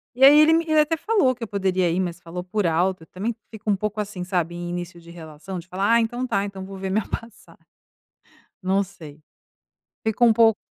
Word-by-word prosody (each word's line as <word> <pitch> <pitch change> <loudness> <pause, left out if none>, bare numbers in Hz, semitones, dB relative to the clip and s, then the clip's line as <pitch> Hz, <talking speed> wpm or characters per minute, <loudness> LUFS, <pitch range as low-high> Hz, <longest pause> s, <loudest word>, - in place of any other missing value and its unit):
e 260 - +1
aí 290 +2 +9
ele 315 +1 +6
me 330 - +3
ele 310 0 +3
até 305 +2 +3
falou 335 -6 +2
que 245 -1 -9
eu - - -4
poderia 190 -3 0
ir, 170 - 0
mas 175 -2 -2
falou 175 +1 -7
por 190 0 -1
alto, 175 +1 0
também 220 +5 -4
fico 220 -1 -7
um 205 - +4
pouco, 210 +2 -3
assim, 200 -3 -4
sabe, 175 -2 -1
em 175 0 -5
início 175 0 -6
de 170 - -15
relação 165 +2 -8
de 175 +1 -9
falar: 195 +5 +1
"Ah, 235 - +6
então 240 +3 -2
tá, 200 -4 0
então 195 -1 -7
vou 195 0 -8
ver 190 0 -4
minha 210 +1 0
passa" 230 -1 -8 1.1
não 190 +2 +2
sei, 160 -6 -12 0.8
fico 220 +2 +1
um 235 - +7
pouco 225 -1 +4
195 Hz, 225 wpm, -23 LUFS, 180-230 Hz, 1.1 s, aí